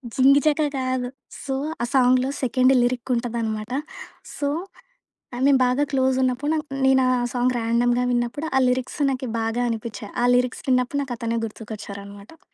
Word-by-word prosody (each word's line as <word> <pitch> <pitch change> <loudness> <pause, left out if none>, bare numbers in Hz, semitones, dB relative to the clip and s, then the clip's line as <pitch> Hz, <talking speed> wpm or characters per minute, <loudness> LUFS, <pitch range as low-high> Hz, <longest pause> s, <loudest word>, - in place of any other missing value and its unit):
జింగిచక 285 +3 +4 0.2
కాదు. 255 -1 -1 0.4
సో, 270 - -3 0.3
ఆ - - +2
సాంగ్‌లో 255 0 +4
సెకండ్ 255 +1 +3
లిరిక్ 245 +1 -1
ఉంటదన్నమాట. 230 -2 -3 0.7
సో, 285 -1 -1 1.0
మేము 275 -2 +5
బాగా 255 +3 +1
క్లోజ్ 260 -1 +2
ఉన్నప్పుడు 275 +5 0 0.3
నేను 265 -1 +4
ఆ - - +3 0.2
సాంగ్ 250 0 +1
ర్యాండమ్‌గా 240 +2 +1
విన్నప్పుడు 240 +5 -1
ఆ - - +4
లిరిక్స్ 255 +3 -1
నాకు 260 -1 -3
బాగా 225 +2 -1
అనిపించాయి. 215 -2 -5
ఆ - - +4
లిరిక్స్ 250 0 0
విన్నప్పుడు 255 +2 +1
నాకు 250 -3 -5
అతనే 230 0 -1
గుర్తుకొచ్చారన్నమాట. 205 +3 -9
250 Hz, 140 wpm, -23 LUFS, 235-265 Hz, 1.0 s, మేము